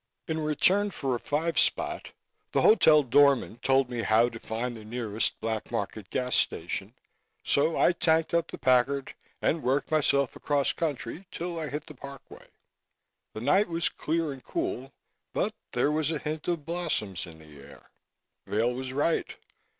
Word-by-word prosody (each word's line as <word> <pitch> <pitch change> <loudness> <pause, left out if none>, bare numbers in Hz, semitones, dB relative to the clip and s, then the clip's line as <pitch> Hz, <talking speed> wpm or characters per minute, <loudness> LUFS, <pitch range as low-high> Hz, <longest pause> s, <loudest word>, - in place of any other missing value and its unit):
In 160 0 -1
return 180 +7 +3
for 135 -8 -2
a 120 - -1
five 160 +6 0
spot - - 0 0.4
the - - +2
hotel 160 - +6
door 140 +2 +6
man 120 -2 -8
told 135 +1 +3
me 120 -2 -3
how 115 +2 +4
to 115 - -9
find 120 +3 -4
the 110 - -10
nearest 110 -1 -2
Black 110 -1 -3
Market 105 -3 -4
gas 125 -1 -1
station, - - -1 0.5
so 155 +3 +2
I - - +5
tanked 160 -2 +1
up 170 -1 +2
the - - -7
Packard 130 +2 +2 0.3
and 160 - +1
worked 135 +4 0
myself 140 -3 +2
across 145 -2 0
country 145 -7 -3
until 175 -2 -6
I 155 -2 -4
hit 150 +1 -5
the - - -11
Parkway. 140 0 -12 0.9
The 110 - -6
night 195 - +3
was 170 -1 0
clear 160 -1 -2
and 130 - -13
cool 135 +2 -3 0.4
but - - 0 0.2
there 125 +4 +2
was 155 -1 0
a 160 - -1
hint 150 +1 -5
of 170 -5 -1
blossoms 155 - -2
in 80 -1 -12
the 75 -2 -15
air. 70 - -16 0.6
Vail 115 +4 +1
was 130 +1 -5
right. 150 +4 0
140 Hz, 170 wpm, -28 LUFS, 120-160 Hz, 0.9 s, hotel